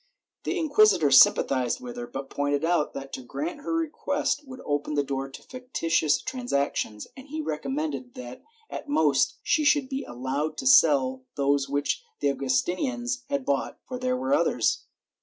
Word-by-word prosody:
The - - -1
inquisitor 215 - +4
sympathized 130 -1 +5
with 125 -1 -8
her, 120 0 -6
but 135 +3 -7
pointed 145 +1 0
out 170 -3 +1
that 135 0 -7
to - - -5
grant 300 - -5
her - - -4
request 295 -2 -1
would 255 -1 -9
open 145 +1 -1
the 145 - +2
door 135 0 -3
to 135 - -12
fictitious 170 - 0
transactions, 140 - -2
and 265 +1 -12
he 310 +2 -5
recommended 140 - -3
that 125 0 -9 0.3
at 295 - -7
most 150 - +2
she 305 +1 +2
should 290 -2 +3
be 270 0 -3
allowed 135 +5 -3
to 135 - -5
sell 130 -1 +5
those 140 0 +1
which 145 - -1 0.2
the 140 - +2
Augus 130 -1 +1
tinians 245 +5 -3
had 280 -2 -1
bought, 280 0 -1
for 250 -1 -5
there 255 0 0
were 260 +2 -1
others. 290 - +1
150 Hz, 170 wpm, -26 LUFS, -, 0.3 s, sympathized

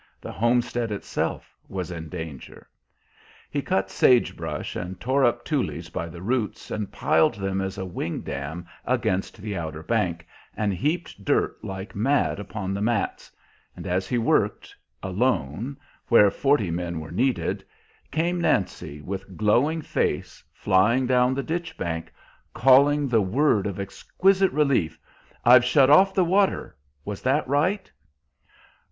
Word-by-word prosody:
The - - -8
homestead 120 0 0
itself 100 - -3
was 90 -3 -4
in 80 -2 -7
danger. 80 -6 -8 0.8
He - - -1
cut 95 0 -1
sage 125 -2 +4
brush - - -5
and 90 +1 -5
tore 135 +2 +1
up 120 -1 +1
tules 125 - -2
by 85 - -4
the 85 +2 -10
roots, 115 0 -2
and 105 -2 -3
piled 80 +8 +2
them 95 -1 -2
as 95 +1 -4
a 95 - -4
wing 85 -2 -4
dam 75 +5 -5 0.2
against 95 +4 -1
the 105 0 -5
outer 80 -3 -5
bank, 85 -5 -1 0.3
and 105 -2 0
heaped 150 - -2
dirt - - 0
like 95 +2 -6
mad 130 +2 +1
upon 95 -1 -4
the 100 - -3
mats; 110 -1 -1 0.4
and - - -9
as 90 +1 -1
he 125 - 0
worked, 115 - 0 0.3
alone, 110 - -1 0.3
where 105 -4 +6
forty 135 -7 +1
men 85 -1 -3
were 80 - -8
needed, 125 +8 0 0.5
came 170 +3 0
Nancy, 75 - -1
with 95 +1 -6
glowing 140 +10 +2
face, - - -2
flying 115 +8 +2
down 125 +1 +3
the 140 - -2
ditch 170 +1 -4
bank, 80 -1 -4 0.4
calling 140 +3 +5
the 115 -4 +3
word 105 +1 +2
of 100 -1 -5
exquisite 190 - +1
relief: 140 - +1 0.5
"I've 120 +1 +8
shut 130 +2 +4
off 190 +6 +6
the 185 - +3
water. 195 +3 +1 0.3
Was 105 -1 -5
that 135 +3 +1
right?" 180 +9 0
105 Hz, 145 wpm, -25 LUFS, 95-135 Hz, 0.8 s, I've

